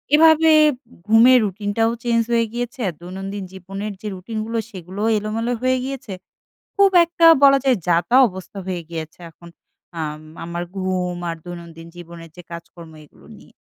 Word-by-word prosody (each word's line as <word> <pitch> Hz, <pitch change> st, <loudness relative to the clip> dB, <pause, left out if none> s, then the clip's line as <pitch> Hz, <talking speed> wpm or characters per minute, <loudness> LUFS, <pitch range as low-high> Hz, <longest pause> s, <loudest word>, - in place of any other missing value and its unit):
এভাবে 320 Hz, 0 st, +5 dB, 0.2 s
এব 290 Hz, -, -2 dB, 0.3 s
ঘুমের 235 Hz, +4 st, +6 dB
রূটিনটাও 205 Hz, +3 st, -1 dB
চেঞ্জ 230 Hz, -1 st, +2 dB
হয়ে 230 Hz, -1 st, +2 dB
গিয়েছে। 245 Hz, 0 st, -4 dB, 0.2 s
দৈনন্দিন 195 Hz, +3 st, -6 dB
জীবনের 195 Hz, +3 st, -6 dB
যে 215 Hz, -, -6 dB
রুটিনগুলো 220 Hz, +4 st, -5 dB
সেগুলোও 190 Hz, +1 st, -5 dB
এলোমেলো 225 Hz, +3 st, -2 dB
হয়ে 255 Hz, 0 st, +1 dB
গিয়েছে। 260 Hz, -5 st, -6 dB, 0.6 s
খুব 400 Hz, -1 st, +4 dB
একটা 335 Hz, 0 st, +1 dB, 0.2 s
বলা 275 Hz, 0 st, +7 dB
যায় 255 Hz, -4 st, +3 dB
যাতা 175 Hz, +8 st, +2 dB
অবস্থা 190 Hz, +1 st, -11 dB
হয়ে 180 Hz, -2 st, -3 dB
গিয়েছে 160 Hz, -1 st, -7 dB
এখন 170 Hz, +2 st, -16 dB, 0.5 s
আম 155 Hz, -1 st, -4 dB, 0.2 s
আমার 170 Hz, +1 st, -4 dB
ঘুম 185 Hz, -1 st, -2 dB
আর 165 Hz, -, -3 dB
দৈনন্দিন 170 Hz, -1 st, -10 dB
জীবনের 170 Hz, -1 st, -11 dB
যে 180 Hz, -, -10 dB
কাজকর্ম 170 Hz, 0 st, -11 dB
এগুলো -, -, -21 dB
নিয়ে। -, -, -19 dB
200 Hz, 150 wpm, -20 LUFS, 175-235 Hz, 0.6 s, বলা